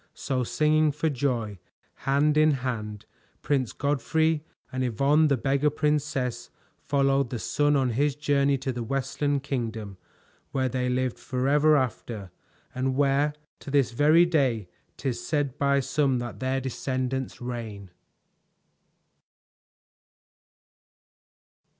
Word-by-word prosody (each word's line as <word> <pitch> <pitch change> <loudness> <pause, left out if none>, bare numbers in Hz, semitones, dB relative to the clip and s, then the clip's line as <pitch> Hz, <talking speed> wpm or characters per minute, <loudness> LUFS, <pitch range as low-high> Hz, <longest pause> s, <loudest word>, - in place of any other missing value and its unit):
So 130 -2 -1
singing 155 +4 +2
for 150 +2 -1
joy, 120 -7 -2 0.5
hand 145 +2 +3
in 155 -4 +3
hand, 105 -3 -4 0.4
Prince 135 -5 0
Godfrey 150 +3 0 0.3
and 130 0 -2
Yvonne 140 +6 +3
the 140 -2 +2
Beggar 140 +5 +1
Princess 145 -5 -1 0.3
followed 140 -2 +1
the 120 - -3
sun 145 +5 +1
on 130 -3 +2
his 140 +4 +1
journey 140 -1 +2
to 135 0 -3
the 120 - -4
Westland 135 +3 -1
Kingdom, 115 -7 -4 0.5
where 130 -1 0
they 125 0 -1
lived 125 0 -1
forever 145 +4 +3
after, 115 -6 -3 0.4
and 130 +1 -1
where 145 +1 +2 0.2
to - - -9
this 140 -3 +2
very 155 +7 +5
day 130 - +1 0.3
'tis 130 -4 -3
said 145 -3 -1
by 140 0 +3
some 135 0 +1
that 120 -1 -5
their 130 +1 0
descendants 130 0 -3
reign. 110 -6 -6
135 Hz, 120 wpm, -26 LUFS, 125-145 Hz, 0.5 s, very